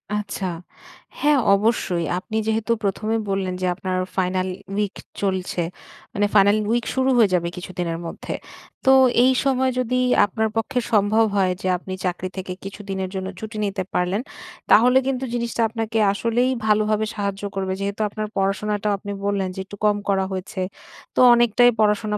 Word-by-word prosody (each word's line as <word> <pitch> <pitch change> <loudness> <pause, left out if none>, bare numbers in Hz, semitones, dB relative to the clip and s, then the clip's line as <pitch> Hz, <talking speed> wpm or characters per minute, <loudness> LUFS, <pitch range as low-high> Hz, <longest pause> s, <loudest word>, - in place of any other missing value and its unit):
আচ্ছা। 205 -2 -3 0.7
হ্যাঁ 295 -1 +4 0.2
অবশ্যই 195 -5 0
আপনি 220 +4 -4
যেহেতু 220 +1 0
১ম 200 +2 -1
এ - - +2
বললেন 195 -1 -1
যে - - 0
আপনার 185 0 -3 0.2
ফাইনাল 185 0 0 0.3
উইক 205 -1 -1 0.3
চলছে। 185 -3 -1 0.5
মানে 205 - +1
ফাইনাল 205 0 +5
উইক 235 0 +1
শুরু 260 0 +2
হয়ে 220 -4 +5
যাবে 170 -1 +1
কিছুদিনের 175 -2 -4
মধ্যে। - - -6 0.5
তো 265 - +6 0.3
এই 260 - +5
সময় 260 -1 +2
যদি 255 +1 0 0.3
আপনার 220 +2 -1
পক্ষে 250 +3 0
সম্ভব 215 +1 +4
হয় 185 -1 +3
যে 185 - -2
আপনি 185 +1 -7
চাকরি 180 +1 -2
থেকে 185 0 -4
কিছুদিনের 195 -1 -5
জন্য 190 0 -3
ছুটি 220 +1 -7
নিতে 195 -1 -2
পারলেন, 180 +4 0 0.5
তাহলে 250 +4 +6
কিন্তু 265 -1 -1
জিনিসটা 235 -1 -2
আপনাকে 225 0 -3 0.2
আসলেই 235 +4 +1 0.2
ভালোভাবে 215 0 +2
সাহায্য 200 -1 -3
করবে। 190 -1 -1
যেহেতু 200 +2 -3
আপনার 215 +1 -4
পড়াশোনাটাও 205 +2 0
আপনি 205 +1 -7
বললেন 200 -2 0
যে - - -7
একটু 205 +1 -11
কম 205 -1 +3
করা 190 -1 +2
হয়েছে। 185 0 -4 0.5
তো - - 0
অনেকটাই 240 0 +5
পড়াশোনা 210 0 +2
205 Hz, 160 wpm, -22 LUFS, 190-225 Hz, 0.7 s, তো